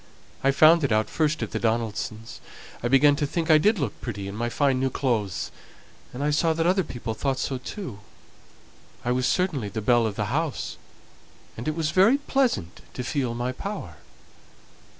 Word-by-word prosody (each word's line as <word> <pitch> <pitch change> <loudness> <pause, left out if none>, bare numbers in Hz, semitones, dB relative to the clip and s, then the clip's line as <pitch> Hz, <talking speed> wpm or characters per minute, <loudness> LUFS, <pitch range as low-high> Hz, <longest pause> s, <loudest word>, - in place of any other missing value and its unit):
I 135 - +4
found 155 +4 +6
it 135 - +1
out 110 0 +1
first 155 -1 0
at - - -5
the - - -2
Donaldsons'. 110 -1 -2 0.4
I 120 - 0
began 140 +3 +5
to 145 -1 0
think 165 +2 0
I 155 - +7
did 210 +7 +3
look 140 - -3
pretty 100 -5 -5
in 100 - -6
my 120 +2 -2
fine 135 +2 +1
new 135 0 +1
clothes, 115 -8 -1 0.6
and 130 +3 -5
I 150 - +2
saw 160 +2 +2
that 165 +1 -1
other 185 +2 +3
people 120 -6 -5
thought 135 +4 -1
so 130 -1 -2
too. 130 - -7 1.1
I 120 - +1
was 125 +1 +1
certainly 155 - 0
the 110 - -4
belle 115 +1 +3
of 105 - -4
the 105 +3 -2
house, 155 -1 -2 0.8
and 115 - -6
it 155 - 0
was 160 -2 -1
very 195 - +5
pleasant 265 - -1
to 125 - -3
feel 125 -1 -1
my 120 +1 -2
power. 200 +10 -6
135 Hz, 190 wpm, -25 LUFS, 115-155 Hz, 1.1 s, I